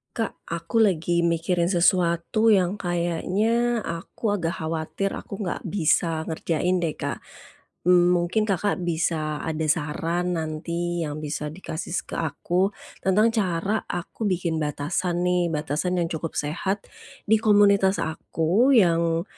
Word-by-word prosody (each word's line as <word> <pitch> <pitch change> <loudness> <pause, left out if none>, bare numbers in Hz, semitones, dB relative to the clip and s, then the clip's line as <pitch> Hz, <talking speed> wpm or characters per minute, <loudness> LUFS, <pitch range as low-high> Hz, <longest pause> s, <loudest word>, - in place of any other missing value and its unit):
Kak, 225 -3 -3
aku 170 +7 -2
lagi 175 -4 +2
mikirin 170 +1 +1
sesuatu 175 +3 +2
yang 195 -2 +3
kayaknya, 200 +7 0
aku 170 +6 -3
agak 170 +1 -2
khawatir, 160 +4 -2
aku - - -7
nggak 175 - -3
bisa 160 -3 +1
ngerjain 170 +2 0
deh, 165 -3 -1
Kak. - - -3 0.7
Mmm, 180 0 +6
mungkin 175 +5 +1
Kakak 195 -1 0
bisa 160 -3 -1
ada 160 0 -2
saran 165 +3 0
nanti 170 +2 -3
yang 150 +1 -5
bisa 150 0 -3
dikasih 170 0 -4
ke - - -7
aku 175 +4 0 0.4
tentang 210 +4 +4
cara 195 +1 0
aku 175 +5 -5
bikin 170 -3 0
batasan 160 +4 -1
nih, 180 -1 +2
batasan 155 +4 -1
yang 170 - 0
cukup 165 0 -4
sehat 190 +7 -2 0.5
di 220 - +6
komunitas 200 -2 +5
aku 170 - +1
yang, 170 -5 +3
175 Hz, 130 wpm, -24 LUFS, 165-190 Hz, 0.7 s, Mmm